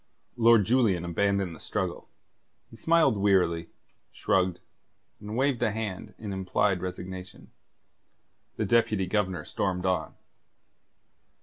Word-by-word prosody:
Lord 115 -3 +5
Julian 105 -7 +2
abandoned 95 0 0
the - - -14
struggle. - - -4 0.6
He - - -12
smiled 160 -3 +3
wearily, 90 -4 +2 0.4
shrugged, 95 -2 0 0.6
and 105 +2 -6
waved 135 -2 +1
a 120 - +3
hand 105 -3 -5
in 105 -3 -6
implied 95 0 0
resignation. 90 +1 -7 1.0
The - - -1
Deputy 110 -4 +2
Governor 95 -4 -1
stormed 90 -1 -2
on. 95 -1 -1
100 Hz, 110 wpm, -27 LUFS, 90-110 Hz, 1.0 s, Lord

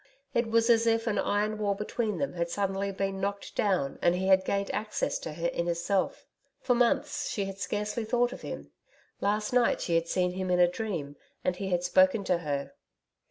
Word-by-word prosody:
It 235 -1 +1
was 230 0 +3
as 230 0 +4
if 225 0 +2
an 220 -3 0
iron 210 +1 0
wall 200 -1 +1
between 210 +1 -2
them 280 - -2
had 170 -1 -2
suddenly 195 +1 -1
been 195 0 -2
knocked 200 +1 -3
down 185 -10 0
and 175 0 +4
he 185 +1 -1
had 190 0 +6
gained 200 +1 -1
access 215 +1 -1
to 155 - -6
her 170 +2 -1
inner 170 0 0
self. 185 +3 -1 0.3
For 250 - +2
months 280 +5 +1
she 200 - -1
had 195 0 -7
scarcely 210 +4 -2
thought 245 +2 +1
of - - -9
him. - - -7 0.5
Last 210 +3 0
night 245 -1 +3
she 170 - -2
had 165 0 +2
seen 180 +1 +1
him 185 0 -3
in 180 0 +3
a 175 - +7
dream, 175 -7 -4 0.3
and 180 - +1
he 195 +1 -4
had 175 -1 +1
spoken 185 +3 +4
to 180 -2 +1
her. 145 -4 -3
195 Hz, 205 wpm, -29 LUFS, 180-220 Hz, 0.5 s, a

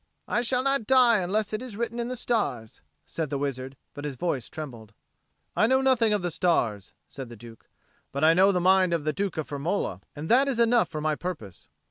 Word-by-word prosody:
"I 240 - +1
shall 250 +1 0
not 275 -5 0
die 250 -4 +5
unless 205 +4 -1
it 215 - -1
be 250 -5 -8
written 235 +1 -3
in 235 - -2
the 255 - -4
stars," 205 - -2 0.2
said 160 -3 -4
the 140 - -2
wizard, 135 -1 -4 0.2
but 145 - -8
his 145 -2 -4
voice 135 -3 -2
trembled. 120 -9 -9 0.6
"I 215 - +4
know 260 +2 +3
nothing 250 -4 +3
of 205 -3 +1
the 175 - -1
stars," 120 - 0 0.2
said 135 -3 -8
the 120 - -10
Duke, 115 0 -14 0.4
"but 140 +2 -3
I 160 +1 +7
know 190 +3 +5
the 180 - +1
mind 185 -1 +4
of 160 - -3
the 155 0 -1
Duke 195 +1 -3
of 155 - -3
Firmola, 145 - -2
and 150 +2 -6
that 260 +7 +4
is 270 -4 -1
enough 235 0 +3
for 155 - -5
my 155 0 +1
purpose." 150 - -7
175 Hz, 220 wpm, -26 LUFS, 140-230 Hz, 0.6 s, I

